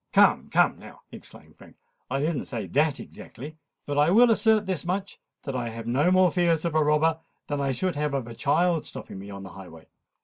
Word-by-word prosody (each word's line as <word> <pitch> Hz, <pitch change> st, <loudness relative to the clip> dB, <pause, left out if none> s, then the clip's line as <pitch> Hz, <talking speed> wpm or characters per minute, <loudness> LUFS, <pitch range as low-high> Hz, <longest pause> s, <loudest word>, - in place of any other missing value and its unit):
"Come, -, -, +4 dB
come -, -, +2 dB
now," -, -, -14 dB
exclaimed -, -, -13 dB
Frank: -, -, -17 dB, 0.3 s
"I 135 Hz, +2 st, -1 dB
don't 155 Hz, -1 st, -1 dB
say 115 Hz, -5 st, -5 dB
that 145 Hz, -, +1 dB
exactly. 150 Hz, +5 st, -10 dB, 0.3 s
But 145 Hz, 0 st, -1 dB
I 150 Hz, +2 st, +4 dB
will 235 Hz, +5 st, +6 dB
assert 220 Hz, -1 st, +3 dB
this 185 Hz, -6 st, -2 dB
much—that 180 Hz, -6 st, -6 dB
I 120 Hz, -2 st, -2 dB
have 115 Hz, 0 st, -8 dB
no 130 Hz, +8 st, +2 dB
more 185 Hz, -1 st, +4 dB
fears 170 Hz, -3 st, +1 dB
of 170 Hz, -, -1 dB
a 155 Hz, -1 st, +3 dB
robber 155 Hz, +2 st, +2 dB, 0.3 s
than 145 Hz, -1 st, -3 dB
I 135 Hz, -1 st, 0 dB
should 180 Hz, +7 st, -2 dB
have 150 Hz, -1 st, -1 dB
of 135 Hz, -3 st, -2 dB
a 115 Hz, -, -9 dB
child's 160 Hz, +6 st, +1 dB
stopping 95 Hz, -, -9 dB
me 100 Hz, +1 st, -9 dB
on 100 Hz, -1 st, -8 dB
the 95 Hz, -, -9 dB
highway." 85 Hz, -3 st, -12 dB
150 Hz, 210 wpm, -26 LUFS, 125-175 Hz, 0.3 s, will